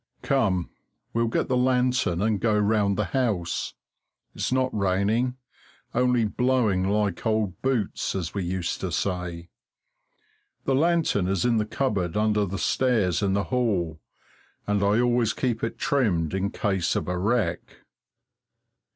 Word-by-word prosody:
Come, 100 -10 +1 0.4
we'll 115 0 +1
get 115 - 0
the 130 - +1
lantern 125 -7 +2
and 110 -2 +1
go 110 -2 +2
round 105 -1 +2
the 105 -5 -2
house. 105 -11 -1 0.6
It's - - -2
not 130 -1 +1
raining 105 +6 +1 0.6
only 125 -1 +2
blowing 110 -5 +1
like 105 -3 0
old 110 -5 -1
boots, 125 -9 -1
as 85 -4 -3
we 100 - -2
used 90 0 -3
to - - -3
say. 90 -2 -3 1.2
The 135 - +1
lantern 155 - +2
is 95 +1 0
in 120 -2 +3
the 105 -1 0
cupboard 100 -9 -1
under 105 -1 +2
the 95 +2 -4
stairs 110 -8 +1
in 100 -2 +1
the 100 0 +1
hall, 90 -11 0 0.6
and 105 -1 0
I 100 +3 +3
always 120 -2 +2
keep 120 -4 -2
it 115 - -2
trimmed 95 - +1
in 95 +1 0
case 95 -5 -1
of - - -2
a 90 - -1
wreck. 95 -2 0
105 Hz, 145 wpm, -25 LUFS, 95-125 Hz, 1.2 s, in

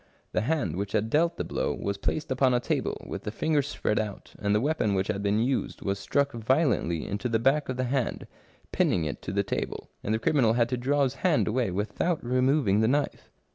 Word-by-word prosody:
The - - +1
hand 115 - -1
which 100 0 -3
had 110 +1 0
dealt 165 +3 +2
the - - -1
blow - - -2
was 100 0 -3
placed 150 - -2
upon 130 -1 +3
a - - +3
table - - -2
with - - -5
the - - -4
fingers 145 +5 0
spread 105 -6 -1
out, 105 -3 -5
and 100 0 +1
the - - +4
weapon 125 -6 +1
which 95 +1 0
had 100 -2 -1
been 100 +1 +1
used 125 +4 -1
was 100 0 -1
struck 140 +7 +1
violently 115 - +1
into 105 +5 -3
the 115 - +2
back 135 +6 +2
of 130 - -2
the 130 - 0
hand, 130 0 -1 0.5
pinning 85 -4 +2
it 75 - -4
to - - -5
the 100 +1 +1
table, 95 - -4
and 105 - -2
the 110 - +2
criminal 115 -1 +3
had 120 0 +2
to 125 - 0
draw 140 +4 +1
his 130 -1 0
hand 175 -5 +3
away 120 0 +1
without 110 - -1
removing 125 -4 +2
the 110 - +3
knife. 140 +3 -1
120 Hz, 225 wpm, -27 LUFS, 100-140 Hz, 0.5 s, the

